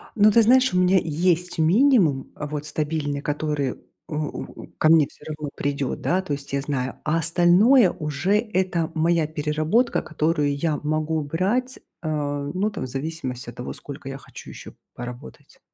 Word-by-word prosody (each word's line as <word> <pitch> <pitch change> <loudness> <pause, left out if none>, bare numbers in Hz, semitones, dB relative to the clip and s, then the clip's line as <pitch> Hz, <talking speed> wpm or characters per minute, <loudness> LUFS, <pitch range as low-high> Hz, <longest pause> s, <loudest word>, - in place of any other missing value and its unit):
Ну 210 0 +6
ты 230 - +6
знаешь, 255 +2 +4
у 180 - +3
меня 180 +1 +4
есть 175 +2 0
минимум, 175 - +3
э, - - -5
вот 150 0 -5
стабильный, 150 -1 -2
который, 150 -3 -2 0.3
у 160 - -5 0.5
у - - -11
ко 155 - +3
мне 160 -3 +6
всё - - -18
равно 150 -2 -5
придет, 140 -2 -2
да, 185 +2 +1
то 155 - -4
есть 140 -1 -6
я 140 - +1
знаю, 135 -2 -3
а 155 +2 +1
остальное 180 - +5
уже 150 +4 -2
это 185 -6 -1
моя 165 0 +2
переработка, 155 +10 0
которую 155 -2 0
я 150 +1 -1
могу 155 +1 0
брать, 205 - -1 0.2
а, 145 -3 -2
ну, 195 +4 0
там, 205 -9 -6
в - - -6
зависимости 135 -2 -5
от - - -10
того, 125 - -6
сколько 140 -1 -9
я 135 - -6
хочу - - -12
еще - - -11 0.2
поработать. 120 - -10
155 Hz, 170 wpm, -23 LUFS, 145-180 Hz, 0.5 s, Ну